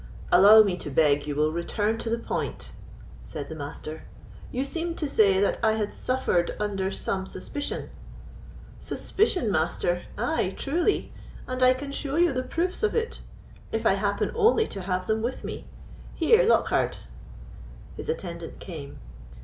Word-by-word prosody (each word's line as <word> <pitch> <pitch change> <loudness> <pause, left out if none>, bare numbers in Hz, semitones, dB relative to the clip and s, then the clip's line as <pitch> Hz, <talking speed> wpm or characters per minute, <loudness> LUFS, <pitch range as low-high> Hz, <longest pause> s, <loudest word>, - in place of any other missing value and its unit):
"Allow 210 +4 +9
me 190 -4 -1
to 150 - -6
beg 145 0 +3
you 145 - -2
will 155 +1 +2
return 205 +6 -1
to 230 - -4
the 230 - +1
point," - - -4 0.5
said 145 -2 -7
the 160 - -6
Master; 155 +1 -7 0.5
"you 260 +2 -1
seemed 335 +3 -3
to 305 - -1
say 200 -8 +4
that 200 - +1
I 220 -1 +4
had 215 -2 -2
suffered 255 -9 0
under 195 -2 -1
some 190 0 -3
suspicion." 285 +11 -5 0.9
"Suspicion, 365 - 0
Master! 175 +1 0 0.2
Ay, 215 -4 0
truly, 340 +8 0 0.3
and 255 0 -4
I 255 0 +6
can 280 +2 -6
show 280 0 -3
you 345 -2 +4
the 255 - 0
proofs 345 +7 -2
of 435 - +1
it; 460 0 -2 0.5
if - - -2
I - - +5
happen - - 0
only 450 0 +4
to 195 - -5
have 185 0 -2
them 220 0 0
with 240 +3 -3
me. - - -6 0.5
Here, 450 +9 +5
Lockhard." - - +2 1.0
His - - -7
attendant 170 - -5
came. 150 -6 -8
215 Hz, 155 wpm, -26 LUFS, 175-285 Hz, 1.0 s, Allow